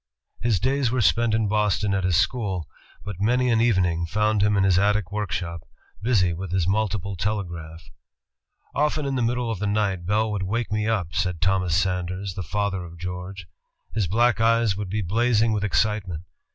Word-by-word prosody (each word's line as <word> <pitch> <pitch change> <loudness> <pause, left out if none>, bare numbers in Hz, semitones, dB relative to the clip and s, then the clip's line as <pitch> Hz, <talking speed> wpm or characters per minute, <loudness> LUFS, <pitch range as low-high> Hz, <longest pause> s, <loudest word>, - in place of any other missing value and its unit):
His 115 -6 +1
days 130 +3 +1
were 125 +2 -1
spent 115 +2 +3
in 110 -1 +1
Boston 105 -1 +1
at 95 -1 0
his 90 -2 +2
school, 95 - 0 0.4
but 105 -4 -5
many 125 +3 +2
an 115 -1 +3
evening 90 -7 +2
found 105 +3 +1
him 105 0 +3
in 95 - +3
his 95 -1 +4
attic 100 -2 +1
workshop, 90 -5 -3 0.4
busy 100 -6 +2
with 90 +1 -6
his 90 -2 +1
multiple 100 -1 -1
telegraph. 85 -5 -4 0.9
"Often 150 0 0
in 140 - -1
the 130 - 0
middle 120 0 0
of 110 - -4
the 105 - -1
night 100 -4 0
Bell 110 +2 +1
would 105 -2 -2
wake 105 +3 -2
me 105 0 0
up," 95 -7 -1
said 90 0 -1
Thomas 90 -1 +1
Sanders, 95 +1 -1
the 95 - -5
father 95 +2 -2
of 85 0 -11
George. 90 +2 -6 0.5
"His 105 -4 0
black 120 +5 +2
eyes 115 -2 +3
would 100 -1 -5
be 105 +2 -1
blazing 115 +4 +2
with 105 -2 -1
excitement. 100 -5 0
100 Hz, 185 wpm, -24 LUFS, 90-110 Hz, 0.9 s, his